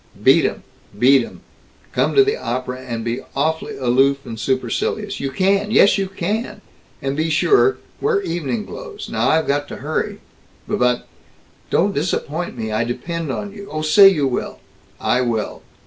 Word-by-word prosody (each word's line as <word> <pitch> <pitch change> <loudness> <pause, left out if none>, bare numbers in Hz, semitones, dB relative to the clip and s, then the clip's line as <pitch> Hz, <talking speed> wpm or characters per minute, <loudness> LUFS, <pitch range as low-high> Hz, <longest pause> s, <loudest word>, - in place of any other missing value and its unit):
Beat - - +6
'em! - - -2 0.3
Beat 130 +4 +5
'em! - - -11 0.5
Come - - +1
to 410 - +8
the 415 +2 +1
opera 125 +1 -4
and 115 -3 -5
be 120 +2 -1 0.2
awf'ly 160 +3 -1
aloof 135 +2 +2
and 110 -1 -7
supercilious. 130 - -1
You 135 - -2
can! 195 +8 +1
Yes, 215 -2 +5
you 195 - 0
can! 210 +4 -3 0.4
And 135 0 -1
be 160 +2 0
sure 405 - +3 0.2
wear 425 -1 +2
evening 175 - -2
clothes. 440 -4 -8
Now - - +1
I've 160 0 +3
got 145 +1 0
to - - -7
hurry." 155 - -2 0.5
"B - - 0
but 125 0 +1 0.3
" - - -33
"Don't 195 +3 +2
disappoint 160 0 -2
me. 110 -1 -3
I 110 +1 +1
depend 155 +6 -3
on 205 +8 -4
you. 200 -1 -10
Oh, 155 0 -3
say 195 +6 +8
you 150 -7 +1
will!" 130 -2 -3 0.4
"I 125 - +1
will!" 115 -3 -2
155 Hz, 175 wpm, -20 LUFS, 125-200 Hz, 0.5 s, to